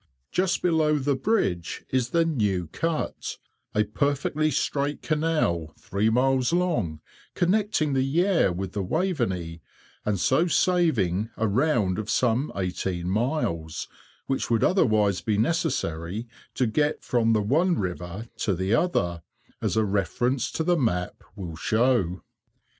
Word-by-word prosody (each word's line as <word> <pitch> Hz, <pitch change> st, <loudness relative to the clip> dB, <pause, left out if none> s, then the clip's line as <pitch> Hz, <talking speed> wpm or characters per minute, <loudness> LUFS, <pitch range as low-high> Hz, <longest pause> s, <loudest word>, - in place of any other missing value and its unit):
Just 185 Hz, -1 st, 0 dB
below 160 Hz, -3 st, +3 dB
the 140 Hz, 0 st, +1 dB
bridge 95 Hz, -, -1 dB
is 125 Hz, -2 st, +1 dB
the 165 Hz, +2 st, +2 dB
New 105 Hz, -, 0 dB
Cut, 160 Hz, -, -3 dB, 0.4 s
a 105 Hz, -, +4 dB
perfectly 145 Hz, +6 st, 0 dB
straight 145 Hz, 0 st, -1 dB
canal, 150 Hz, -, 0 dB
three 100 Hz, +3 st, 0 dB
miles 130 Hz, +3 st, +2 dB
long, 155 Hz, -, 0 dB, 0.3 s
connecting 180 Hz, -5 st, +1 dB
the 135 Hz, -, +2 dB
Yare 165 Hz, -, +2 dB
with 90 Hz, +1 st, -4 dB
the 100 Hz, -, -2 dB
Waveney, 95 Hz, -, -1 dB, 0.4 s
and 105 Hz, -3 st, 0 dB
so 170 Hz, -, +3 dB
saving 125 Hz, -, +2 dB
a 110 Hz, -, +1 dB
round 110 Hz, -, +1 dB
of 110 Hz, 0 st, -5 dB
some 125 Hz, +4 st, +1 dB
eighteen 90 Hz, -1 st, -2 dB
miles, 95 Hz, -, -1 dB, 0.4 s
which 135 Hz, -, -2 dB
would 115 Hz, -2 st, +2 dB
otherwise 110 Hz, -, +3 dB
be 105 Hz, -2 st, 0 dB
necessary 110 Hz, -, -1 dB, 0.3 s
to 130 Hz, -, +2 dB
get 150 Hz, +7 st, 0 dB
from 115 Hz, -2 st, +2 dB
the 105 Hz, -1 st, +2 dB
one 165 Hz, -, +2 dB
river 90 Hz, +3 st, -4 dB
to 100 Hz, -, 0 dB
the 95 Hz, +4 st, 0 dB
other, 85 Hz, -, +1 dB, 0.4 s
as -, -, 0 dB
a 110 Hz, -, +3 dB
reference 120 Hz, +5 st, 0 dB
to 160 Hz, -, -1 dB
the 175 Hz, +1 st, +2 dB
map 90 Hz, -, -1 dB
will 90 Hz, -6 st, -6 dB
show. 110 Hz, -3 st, +1 dB
115 Hz, 135 wpm, -26 LUFS, 95-155 Hz, 0.4 s, a